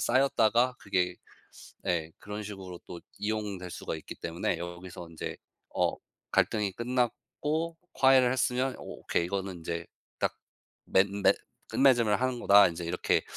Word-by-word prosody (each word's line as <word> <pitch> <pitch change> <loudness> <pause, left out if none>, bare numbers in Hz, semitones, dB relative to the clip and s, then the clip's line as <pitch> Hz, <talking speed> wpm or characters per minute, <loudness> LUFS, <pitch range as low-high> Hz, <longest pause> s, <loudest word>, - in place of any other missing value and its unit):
쌓였다가 125 -1 +3
그게 90 -3 0 0.7
예 85 -3 0
그런 105 +1 -6
식으로 95 -4 -8
또 85 - -8 0.2
이용될 105 -3 -3
수가 80 - -4
있기 80 - -9
때문에 85 0 -2
여기서 85 0 -7
인제 80 - -5 0.4
어 - - +2 0.4
갈등이 105 -3 +2
끝났고 130 - -1 0.2
'화해를 130 -2 +6
했으면 130 0 +1
오케이. - - -2
이거는 95 -1 -3
인제 85 0 -4 0.3
딱 - - 0 0.5
맺 95 +1 +4
맺 100 0 +4 0.3
끝맺음을 120 -6 +4
하는 130 -1 0
거다.' 100 -2 +7
인제 85 0 -5
이렇게 85 - +1
100 Hz, 290 characters per minute, -30 LUFS, 90-125 Hz, 0.7 s, 거다